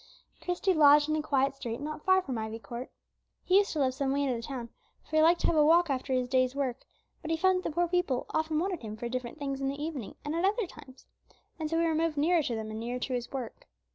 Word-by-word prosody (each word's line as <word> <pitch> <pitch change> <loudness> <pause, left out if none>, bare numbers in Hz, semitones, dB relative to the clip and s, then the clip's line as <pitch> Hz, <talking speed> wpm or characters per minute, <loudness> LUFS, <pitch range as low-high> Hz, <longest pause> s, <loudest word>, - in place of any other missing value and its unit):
Christie 360 +2 +1
lodged 295 -1 +6
in 310 - +2
a 310 - 0
quiet 275 -2 +1
street 240 -3 -5
not 300 +1 -6
far 375 0 +4
from 255 -7 -3
Ivy 220 0 -4
Court. 240 +2 -7 0.5
He 375 +2 +5
used 405 - 0
to 310 - -2
live 260 -2 +2
some 270 0 -1
way 285 +1 +1
out 275 - +1
of 240 - -1
the - - -6
town, 240 -1 -6 0.3
for 310 - -6
he - - +6
liked 335 +2 +4
to - - +1
have 340 - +2
a 305 - +5
walk 335 +1 +5
after 265 0 -2
his 255 -1 +1
day's 255 0 +1
work 265 -4 -1
was - - -29
done; - - -42
but 320 - -6
he 325 - +1
found 375 +2 +3
that - - -3
the 305 - -9
poor 350 0 +2
people 345 -8 0
often 315 0 0
wanted 360 +1 -1
him 215 -2 -7
for 240 - -4
different 250 +3 -4
things 275 -2 -4
in 270 - 0
the 280 +1 -5
evening 295 -8 -5
and 295 - -2
at 335 +2 -1
other 415 +3 +2
times, 285 -6 -14 0.5
and 310 -1 -2
so 330 - 0
he 335 - +2
removed 320 -1 0
nearer 330 +3 +3
to 245 -5 -2
them 220 -1 -5
and 215 - -5
nearer 240 +2 -3
to 255 +1 -3
his 245 -1 -3
work. 255 -5 -6
285 Hz, 285 wpm, -29 LUFS, 255-325 Hz, 0.5 s, lodged